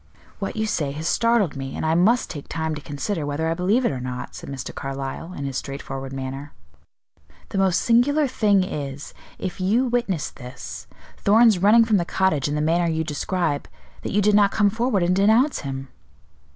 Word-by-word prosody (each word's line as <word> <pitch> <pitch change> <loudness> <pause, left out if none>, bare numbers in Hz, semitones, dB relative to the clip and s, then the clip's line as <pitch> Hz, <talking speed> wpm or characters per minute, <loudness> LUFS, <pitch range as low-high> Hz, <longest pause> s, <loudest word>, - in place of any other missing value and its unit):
"What 195 - -4
you 220 0 0
say 150 -9 -1
has 155 +3 -4
startled 230 -8 +2
me, 135 -1 -5
and - - -2
I 160 - +2
must 210 +9 +3
take 145 -4 -8
time 160 -1 -2
to 150 - -6
consider 150 +5 -3
whether 145 +3 -2
I 165 - +1
believe 195 +9 +1
it - - +2
or 130 - -4
not," 125 0 -5
said - - -9
Mr. 135 -2 -6
Carlyle, 135 +4 -5
in 140 - -5
his 135 -1 -3
straightforward 135 -1 -6
manner. 135 +2 -6 1.0
"The 195 - -2
most 190 -2 +3
singular 275 +6 +3
thing 210 -7 +2
is, 145 -6 -5 0.2
if 185 0 -5
you 220 +8 +2
witnessed 235 - -1
this, 125 -1 -9 0.3
Thorn's 220 -1 +5
running 220 +5 +6
from 220 -2 +3
the 175 - +1
cottage 170 -7 +1
in 145 - -2
the 150 - 0
manner 170 +2 +2
you 160 0 0
describe, 155 0 -2 0.3
that - - -4
you 205 +1 +2
did 210 +1 +4
not 205 -1 +5
come 205 0 +2
forward 225 -3 +1
and 180 +1 +2
denounce 220 +9 +3
him." 135 -1 -5
175 Hz, 195 wpm, -23 LUFS, 145-210 Hz, 1.0 s, running